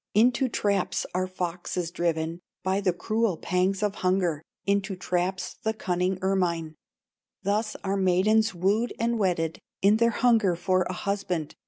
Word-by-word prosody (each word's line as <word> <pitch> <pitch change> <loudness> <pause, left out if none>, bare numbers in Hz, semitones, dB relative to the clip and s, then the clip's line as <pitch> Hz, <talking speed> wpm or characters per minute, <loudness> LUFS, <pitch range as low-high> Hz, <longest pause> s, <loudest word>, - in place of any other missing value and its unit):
"Into 245 +4 +4
traps 200 -4 0
are 185 +1 0
foxes 180 -1 -3
driven 165 -1 -1 0.2
By 190 +1 +1
the 190 -2 +2
cruel 215 +1 0
pangs 185 +4 0
of 205 -1 +1
hunger, 180 -4 +1 0.2
Into 200 0 0
traps, 180 +1 -2
the 220 0 -1
cunning 180 -2 0
ermine; 175 -4 0 0.7
Thus 215 +2 0
are 195 0 0
maidens 195 +3 +3
wooed 205 +7 +1
and 235 0 +1
wedded, 170 -5 0 0.2
In 205 +2 +6
their 235 +1 +4
hunger 225 -6 +3
for 185 +1 +1
a - - -2
husband. 185 -5 -2
190 Hz, 145 wpm, -27 LUFS, 180-210 Hz, 0.7 s, In